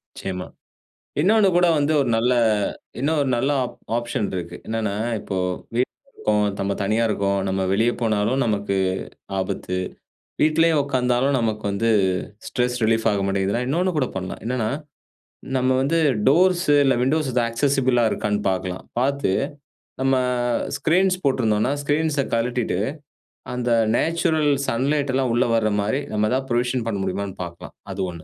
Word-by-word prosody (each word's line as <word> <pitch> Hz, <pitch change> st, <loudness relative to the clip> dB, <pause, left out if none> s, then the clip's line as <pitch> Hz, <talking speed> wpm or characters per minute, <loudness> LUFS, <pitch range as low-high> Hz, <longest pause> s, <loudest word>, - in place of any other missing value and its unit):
நிச்சயமா. 90 Hz, -1 st, -5 dB, 0.8 s
இன்னொன்னு 205 Hz, +4 st, +4 dB
கூட 175 Hz, 0 st, +5 dB
வந்து 150 Hz, +2 st, +1 dB
ஒரு 130 Hz, -, 0 dB
நல்ல 120 Hz, +3 st, +2 dB, 0.7 s
இன்னும் 155 Hz, +4 st, +1 dB
ஒரு 140 Hz, -, 0 dB
நல்ல 135 Hz, +4 st, 0 dB
ஆப் 125 Hz, -, -5 dB, 0.2 s
ஆப்ஷன் 120 Hz, -3 st, -2 dB
இருக்கு. 85 Hz, -2 st, -5 dB
என்னனா, 110 Hz, -2 st, -1 dB, 0.3 s
இப்போ 95 Hz, -2 st, -4 dB, 0.4 s
வீட்ல 130 Hz, -, -3 dB
இருக்கோம், 105 Hz, -1 st, +1 dB
நம்ம 100 Hz, 0 st, 0 dB
தனியா 110 Hz, +4 st, +1 dB
இருக்கோம், 100 Hz, -1 st, 0 dB
நம்ம 95 Hz, 0 st, -1 dB
வெளிய 115 Hz, +4 st, +3 dB
போனாலும் 110 Hz, +3 st, +1 dB
நமக்கு 100 Hz, -3 st, 0 dB, 0.6 s
ஆபத்து. 90 Hz, -1 st, -3 dB, 0.6 s
வீட்லேயும் 155 Hz, 0 st, +4 dB
உட்கார்ந்தாலும் 130 Hz, 0 st, +1 dB
நமக்கு 110 Hz, -2 st, -1 dB
வந்து 115 Hz, +3 st, +1 dB, 0.6 s
ஸ்ட்ரெஸ் 125 Hz, 0 st, 0 dB
ரிலீஃப் 115 Hz, 0 st, +2 dB
ஆக 100 Hz, -, 0 dB
மாட்டேங்குதுன்னா, 100 Hz, +5 st, 0 dB
இன்னொன்னு 180 Hz, +5 st, 0 dB
கூட 130 Hz, -4 st, +1 dB
பண்ணலாம். 95 Hz, -1 st, -5 dB
என்னன்னா, 120 Hz, -3 st, -1 dB, 0.9 s
நம்ம 130 Hz, 0 st, +1 dB
வந்து 150 Hz, +5 st, +1 dB, 0.3 s
டோர்ஸ்ஸு, 175 Hz, 0 st, +4 dB
இல்ல 135 Hz, -, +3 dB
விண்டோஸ் 150 Hz, +2 st, +1 dB
இது 125 Hz, -, +2 dB
ஆக்சஸிபிளா 130 Hz, -1 st, +2 dB
இருக்கான்னு 105 Hz, 0 st, -1 dB
பாக்கலாம். 95 Hz, -1 st, -4 dB, 0.2 s
பாத்து 140 Hz, -6 st, +1 dB, 0.7 s
நம்ம, 135 Hz, 0 st, +3 dB, 0.6 s
ஸ்கிரீன்ஸ் 185 Hz, +3 st, +2 dB
போட்ருந்தோம்னா, 120 Hz, -3 st, +2 dB
ஸ்கிரீன்ஸ்ஸ 145 Hz, 0 st, +1 dB
கழட்டிட்டு. 115 Hz, -4 st, 0 dB, 0.8 s
அந்த 125 Hz, -1 st, -1 dB, 0.3 s
நேச்சுரல் 160 Hz, -2 st, +1 dB, 0.2 s
சன்லைட்டெல்லாம் 135 Hz, 0 st, 0 dB
உள்ள 120 Hz, -, +3 dB
வர 110 Hz, -1 st, +2 dB
மாரி 110 Hz, +7 st, 0 dB
நம்ம 105 Hz, 0 st, +1 dB
எதாது 130 Hz, +1 st, 0 dB
புரொவிஷன் 120 Hz, 0 st, 0 dB
பண்ண 105 Hz, -, -1 dB
முடியுமான்னு 95 Hz, +1 st, -3 dB
பாக்கலாம். 85 Hz, 0 st, -10 dB, 0.2 s
அது 95 Hz, 0 st, -4 dB
ஒண்ணு. 85 Hz, -2 st, -10 dB
125 Hz, 140 wpm, -22 LUFS, 105-140 Hz, 0.9 s, கூட